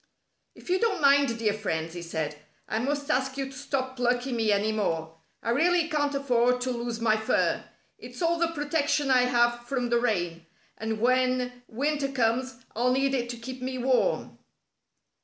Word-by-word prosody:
"If - - -8
you 370 - +3
don't 450 -4 +1
mind, 280 -4 +4
dear 215 -2 +1
friends," 165 -6 -3
he 175 - -6
said, 160 -3 -3 0.3
"I 220 - -1
must 285 +4 -1
ask 265 0 0
you 275 - -1
to 270 - -9
stop 260 -1 -3
plucking 245 +1 0
me 220 -2 +2
any 205 +2 +2
more. 165 -7 -2 0.3
I 230 - 0
really 335 +5 +3
can't 290 -3 0
afford 250 -2 +2
to 255 0 -1
lose 235 -1 -3
my 220 -2 +3
fur. 220 - +1 0.4
It's - - -10
all 340 -1 +1
the 335 - +3
protection 295 -2 0
I 250 -1 +5
have 240 -1 +2
from 250 -2 -1
the 235 - +4
rain, 175 -8 -1 0.3
and 220 0 -3
when 250 0 +1
winter 280 +3 -1
comes 255 +1 -1
I'll 245 +3 +2
need 270 +1 +1
it 240 -2 -1
to 240 - -5
keep 255 +2 -8
me 255 0 -3
warm." 255 - 0
250 Hz, 180 wpm, -27 LUFS, 230-275 Hz, 0.4 s, I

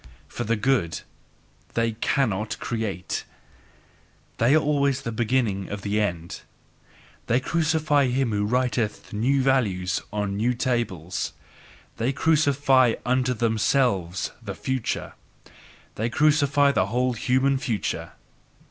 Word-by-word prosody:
For - - -5
the 115 +2 +1
good 105 -7 0 0.7
they 115 0 +1
CANNOT 110 -2 -1
create; 110 -7 -3 1.1
they 120 +6 +4
are - - +6
always 140 -3 +1
the 115 - -3
beginning 110 -4 0
of 100 -1 -5
the 105 +1 0
end: 85 -4 -3 0.9
They 120 - +3
crucify 155 -1 +1
him 125 -1 0
who 105 -1 0
writeth 120 -2 -1
new 130 +6 +2
values 100 -10 +1
on 105 -1 -2
new 120 +4 +1
tables, 95 -9 -2 0.6
they 120 +4 0
sacrifice 140 -5 +3
UNTO 125 0 +1
THEMSELVES 110 -5 +1
the 100 -4 -6
future 130 +1 -3 0.8
they 115 +3 -2
crucify 145 +1 +3
the - - +1
whole 125 +3 0
human 130 +4 +1
future! 115 -5 -3
120 Hz, 115 wpm, -25 LUFS, 105-135 Hz, 1.1 s, are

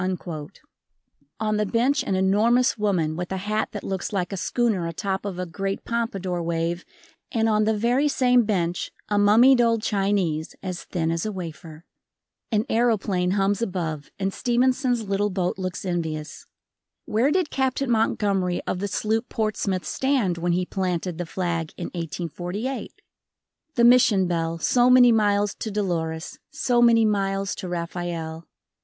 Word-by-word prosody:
On 215 -1 0
the 210 - +1
bench 255 +8 +2
an 195 - -1
enormous 215 +7 +3
woman 185 -8 0
with 175 +2 -5
a 190 - -1
hat 210 +3 -1
that 205 - -6
looks 190 +1 -3
like 190 -2 -2
a - - -1
schooner 200 -2 0
atop 190 +4 -3
of 195 -3 -4
a 180 - -2
great 195 +3 -4
pompadour 195 -7 -2
wave 170 +1 -2 0.5
and 225 -3 +1
on 215 -1 +2
the 220 0 +1
very 245 +7 +2
same 250 -3 +4
bench 180 -5 -1 0.2
a 205 -1 +2
mummied 240 +5 +6
old 230 -2 +2
Chinese 195 -6 0
as 185 -2 -5
thin 165 -3 -1
as 165 0 -1
a 215 - -2
wafer. 165 -3 -8 0.7
An 215 0 +1
aeroplane 210 -6 +1
hums 200 +2 +1
above 165 -8 -3
and 195 0 -2
Stevenson's 250 -1 +1
little 200 +1 +1
boat 185 -1 -2
looks 185 +1 -4
envious. 160 -4 -4 0.6
Where 230 +6 +2
did 355 0 +1
Captain 265 -1 0
Montgomery 200 -5 +1
of 180 - -2
the 205 - -2
sloop 220 +4 -1
Portsmouth 200 -5 -1
stand 240 - 0
when 175 +1 0
he 180 +1 0
planted 180 -2 -2
the 175 - -3
flag 170 -2 -2
in 175 - -4
1848? 175 - -4 0.8
The 240 - +3
Mission 235 -5 +6
bell, 165 -1 -1
so 245 +9 +3
many 250 -1 +7
miles 205 -2 +2
to 220 - -3
Dolores, 170 -6 -3
so 240 -1 +1
many 230 -1 +5
miles 195 -1 0
to 185 - -6
Rafael. 170 -1 -4
195 Hz, 155 wpm, -24 LUFS, 175-225 Hz, 0.8 s, many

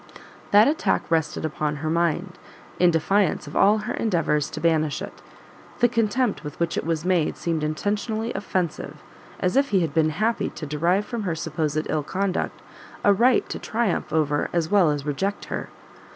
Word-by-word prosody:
That 205 +2 +6
attack 305 +2 +1
rested 160 -1 0
upon 150 -1 -2
her 155 +2 -3
mind, 170 +2 0 0.4
in 180 - +6
defiance 175 +3 +1
of 145 - -10
all 205 +2 +5
her 240 - -2
endeavours 165 -8 0
to - - -6
banish 155 -2 +1
it; - - -8 0.6
the 245 - +4
contempt 230 -2 0
with 150 - -8
which 170 0 0
it - - -1
was 165 -1 -1
made 180 -4 +1
seemed 165 -2 -2
intentionally 210 +8 -2
offensive, 185 -5 -3 0.4
as 180 - +1
if 275 +1 +3
he 195 -3 +3
had 160 -4 -1
been 160 -1 +3
happy 215 +9 0
to 155 - -7
derive 170 +7 +1
from 235 0 -4
her 180 -5 -2
supposed 155 -1 -2
ill 155 - 0
conduct, 190 +5 -2 0.4
a 205 - +6
right 240 +5 +3
to - - -4
triumph 220 -8 -1
over 150 -2 +1
as 170 -1 -1
well 195 -6 +5
as 145 -1 -2
reject 190 +8 -2
her. - - -4
170 Hz, 180 wpm, -24 LUFS, 155-205 Hz, 0.6 s, That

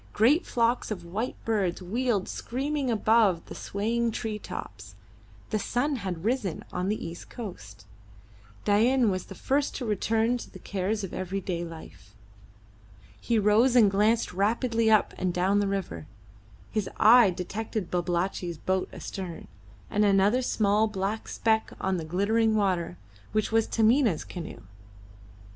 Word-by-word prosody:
Great 265 - +3
flocks 235 +1 +1
of 185 -6 -5
white 210 +8 -3
birds 200 -6 0
wheeled 210 +2 -1
screaming 275 +2 -2
above 215 -5 +3
the - - -9
swaying 230 +4 -1
tree 215 -1 -4
tops. 100 - -8 0.6
The 215 - +1
sun 260 +7 0
had 185 -5 -5
risen 225 -8 -1
on 180 +2 -1
the 215 - -2
east 165 +1 -8
coast. 110 - -9 0.8
Dain 230 +3 +3
was 185 -1 -3
the 195 - -10
first 280 +7 0
to 255 - -4
return 225 +3 +1
to - - -9
the - - -11
cares 200 +2 -2
of 190 - -6
everyday 185 -2 -3
life. 165 -1 -11 1.0
He 235 - 0
rose 220 +5 +4
and 215 -5 +6
glanced 210 +1 +2
rapidly 225 +3 +1
up 215 -1 +4
and 185 -1 0
down 185 +3 +2
the 205 - +1
river. 190 - -4 0.6
His 215 -3 -1
eye 230 0 +7
detected 195 +2 -4
Babalatchi's 175 -1 -1
boat 185 +3 -1
astern, 180 -4 -7 0.4
and 210 - +1
another 200 +4 +4
small 215 -3 +2
black 210 +1 -3
speck 220 -1 0
on 190 -1 0
the 165 - -4
glittering 215 +6 +1
water, 185 - 0 0.4
which 215 0 0
was 225 0 +2
Taminah's 225 - +3
canoe. 170 -3 -8
210 Hz, 145 wpm, -27 LUFS, 185-230 Hz, 1.0 s, eye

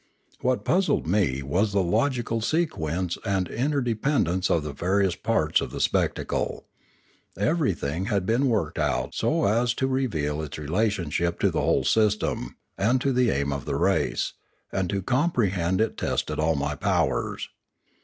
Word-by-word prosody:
What 130 0 0
puzzled 185 +4 +2
me 80 -7 +1
was 95 +10 0
the 100 -2 +3
logical 115 +4 0
sequence 90 - -1
or - - -19 0.2
interde 125 - -1
pendence 105 - 0
of 80 - +2
the 75 -1 -5
various 95 +4 +1
parts - - +1
of - - -3
the - - -6
spectacle. - - -1 0.7
Every 125 - +1
thing 80 +6 -3
had 100 -4 0
been 120 +7 +2
worked 85 -9 -1
out 75 -4 0
so - - +1
as 120 +4 +2
to 130 - 0
reveal 85 - -1
its 75 -2 -6
relationship 85 0 0
to - - +3
the - - 0
whole - - +2
system 105 - +1 0.2
and 115 +6 +3
to 135 +1 0
the 125 -1 +3
aim 70 -4 0
of 70 -2 -5
the - - -2
race, - - +1 0.4
and 95 -2 -1
to 100 -2 -2
comprehend 100 - +1
it 110 - 0
tested - - -2
all 80 +1 +2
my 70 +1 -1
powers. 85 -7 -1
95 Hz, 160 wpm, -25 LUFS, 80-120 Hz, 0.7 s, the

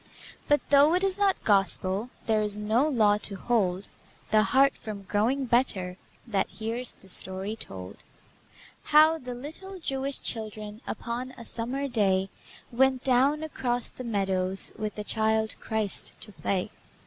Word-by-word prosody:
But 290 0 +2
though 290 +4 +6
it 365 - +1
is 390 0 +2
not 395 -2 +2
Gospel, 195 +2 +1 0.2
There 220 -2 +2
is 210 -1 +1
no 220 +7 +2
law 215 -7 +3
to 200 -1 +2
hold 195 -3 0 0.4
The 215 - +5
heart 270 +5 +4
from 210 -2 -7
growing 225 +8 0
better 225 -7 +1 0.3
That 205 -5 0
hears 230 +3 -4
the 195 - -20
story 190 +3 -1
told: 95 - -6 0.9
How 310 +2 +6
the 250 -2 -6
little 320 +9 -7
Jewish 275 -3 -2
children 215 -1 -5
Upon 245 +2 -4
a 235 - -10
summer 255 +6 -3
day, 195 -6 +2 0.4
Went 260 +1 +2
down 270 +4 +3
across 245 -6 -1
the 255 - -9
meadows 195 -4 +1
With 215 -1 -4
the 210 - -4
Child 220 0 0
Christ 220 -3 -1
to 215 - -8
play. 195 +1 -2
225 Hz, 150 wpm, -27 LUFS, 205-265 Hz, 0.9 s, though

